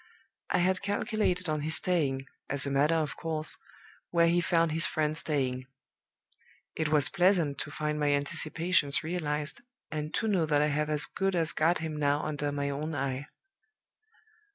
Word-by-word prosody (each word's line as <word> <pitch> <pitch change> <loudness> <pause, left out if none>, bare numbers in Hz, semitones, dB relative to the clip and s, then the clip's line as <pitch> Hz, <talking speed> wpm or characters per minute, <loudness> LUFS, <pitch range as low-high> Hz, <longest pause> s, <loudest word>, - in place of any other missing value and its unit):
I - - +2
had 185 +1 +1
calculated 205 -2 0
on 155 -1 -1
his 155 +1 +3
staying, 140 -8 0 0.2
as 140 0 +2
a 140 - -2
matter 145 +4 +3
of 155 -5 -1
course, 155 -1 -2 0.5
where 170 -1 +4
he 175 +1 +3
found 165 -2 +2
his 165 +3 +3
friend 155 -1 0
staying. 130 -5 -1 1.1
It 160 - 0
was 150 -2 +4
pleasant 175 -6 +2
to - - -1
find 150 +1 -2
my 150 -1 +2
anticipations 145 +2 +1
realized, 150 -3 -3 0.3
and 150 0 -3
to 225 - 0
know 185 -7 +2
that 150 -1 +3
I 150 - +2
have 150 +1 -1
as 150 -1 +3
good 195 -1 -1
as 165 -1 +1
got 165 +3 +2
him 160 -1 -4
now 145 -1 +1
under 145 -1 -2
my 140 0 -2
own 150 +3 -3
eye. 135 +1 -3
155 Hz, 170 wpm, -29 LUFS, 145-170 Hz, 1.1 s, where